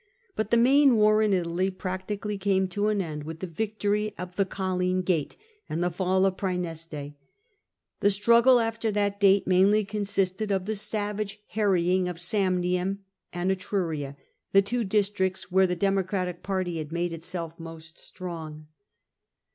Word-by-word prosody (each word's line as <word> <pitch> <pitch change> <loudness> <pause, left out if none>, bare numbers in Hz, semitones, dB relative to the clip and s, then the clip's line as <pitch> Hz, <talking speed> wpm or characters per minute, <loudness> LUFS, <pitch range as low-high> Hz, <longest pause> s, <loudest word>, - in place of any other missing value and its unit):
But 215 - -2
the 235 - +4
main 265 +2 +5
war 215 0 +4
in 215 -1 +2
Italy 180 0 0
practically 190 +3 -4
came 190 -1 +1
to 205 +3 -1
an 210 -2 +1
end 150 -3 -6
with 160 +1 -7
the 185 - -4
victorj 210 +3 -2
of 180 0 -7
the 195 -1 +1
Colline 185 -1 -1
gate 170 -6 -1 0.3
and 165 +3 -1
the 175 - 0
fall 185 +2 +1
of 190 -1 0
Praeneste. 165 -6 -4 0.9
The 205 - +4
struggle 235 +5 +5
after 225 -1 -1
that 200 -1 0
date 200 -1 +5
mainly 195 +3 +4
consisted 200 -1 -1
of 190 -2 0
the 220 +1 -2
savage 210 0 -3
harrying 185 -3 +2
of 175 - -6
Samnium 185 0 0 0.3
and 175 +2 -1
Etruria, 165 -7 -2 0.4
the 195 0 +6
two 240 +4 -1
districts 195 -2 0
where 190 +1 +4
the 180 - -1
Democratic 185 -1 -1
party 185 -4 -2
had 155 -1 -6
made 170 0 -1
itself 165 0 -6
most 165 0 -10
strong. 160 -4 -8
190 Hz, 155 wpm, -27 LUFS, 175-205 Hz, 0.9 s, the